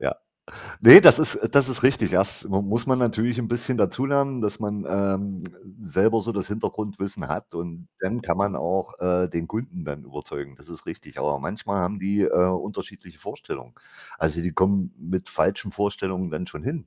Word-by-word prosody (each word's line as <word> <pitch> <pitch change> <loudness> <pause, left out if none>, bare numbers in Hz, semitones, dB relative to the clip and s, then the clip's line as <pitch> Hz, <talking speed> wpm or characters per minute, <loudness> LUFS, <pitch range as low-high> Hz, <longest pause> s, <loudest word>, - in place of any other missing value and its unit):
Ja. - - -1 0.7
Ne, - - +13
das - - +9
ist - - 0
das 140 -2 +4
ist 130 -2 -3
richtig. 130 -6 +2
Das 95 +1 0
m - - -10
muss 115 +3 -2
man 130 -1 +2
natürlich 120 0 0
'n 115 - -3
bisschen 120 +2 -2
dazulernen, 135 +2 0
dass 105 -2 -2
man, 105 -1 -4
ähm, 100 0 -2 0.4
selber 110 +3 +2
so 115 - -4
das 100 -3 -4
Hintergrundwissen 105 -2 -5
hat, - - -6
und 85 0 -8
dann 110 +5 -3
kann 90 0 -2
man 100 -1 0
auch, 90 +3 -3
äh, 90 0 +1
den 85 0 -4
Kunden 130 - -6
dann 70 - -8
überzeugen. 70 -1 -9
Das - - -21
ist - - -12
richtig. - - -10
Aber 75 -1 -1
manchmal 100 +4 -4
haben 95 +3 -3
die, 100 +2 -1
äh, - - +2 0.2
unterschiedliche 95 +3 -7
Vorstellungen. - - -9 0.4
Also, 80 +1 -1
die 85 -1 -3
kommen 95 +1 +1
mit 90 +2 -5
falschen - - -1
Vorstellungen 95 -3 -3
dann 80 +3 -5
schon - - -10
hin 145 +3 -5
100 Hz, 185 wpm, -23 LUFS, 90-115 Hz, 0.7 s, Ne